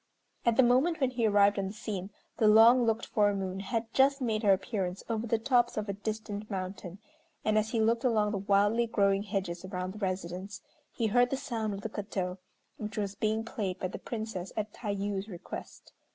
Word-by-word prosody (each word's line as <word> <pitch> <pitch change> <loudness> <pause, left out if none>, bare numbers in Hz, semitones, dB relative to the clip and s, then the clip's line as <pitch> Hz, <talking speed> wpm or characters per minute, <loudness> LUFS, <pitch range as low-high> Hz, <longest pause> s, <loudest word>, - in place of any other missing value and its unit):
At 230 -1 +4
the 265 - +7
moment 265 +8 +3
when 265 -3 +1
he 235 -3 +1
arrived 205 -1 +4
on 195 - -1
the 195 - -6
scene 205 -4 -5 0.3
the 220 - +4
long 230 +3 +7
looked 225 0 +1
for 205 -1 +2
moon 190 -1 -3
had 225 +4 -3
just 275 +1 +4
made 225 -4 0
her 205 -3 +4
appearance 190 -1 -1
over 230 0 -2
the 230 - +2
tops 240 0 +2
of 215 0 -2
a 200 - -2
distant 210 0 -5
mountain, 185 -2 -5 0.5
and 215 - +2
as 215 0 +2
he 230 - -1
looked 230 +2 +2
along 215 -4 +2
the 200 - -2
wildly 205 +4 +3
growing 200 -3 +2
hedges 190 -4 -3
around 185 -1 -4
the 210 - -9
residence, 185 +1 -4 0.3
he 230 - -2
heard 245 +3 +4
the 270 - -1
sound 220 -5 -3
of 195 - -7
the 225 - -4
koto, 195 -3 -4 0.4
which 215 0 -6
was 200 -2 -1
being 220 +1 0
played 200 -5 -3
by 185 - -3
the - - -7
Princess 220 -5 -5
at 215 -1 -2
Tayû's 200 -2 -3
request. 175 -4 -9
210 Hz, 205 wpm, -30 LUFS, 195-230 Hz, 0.5 s, the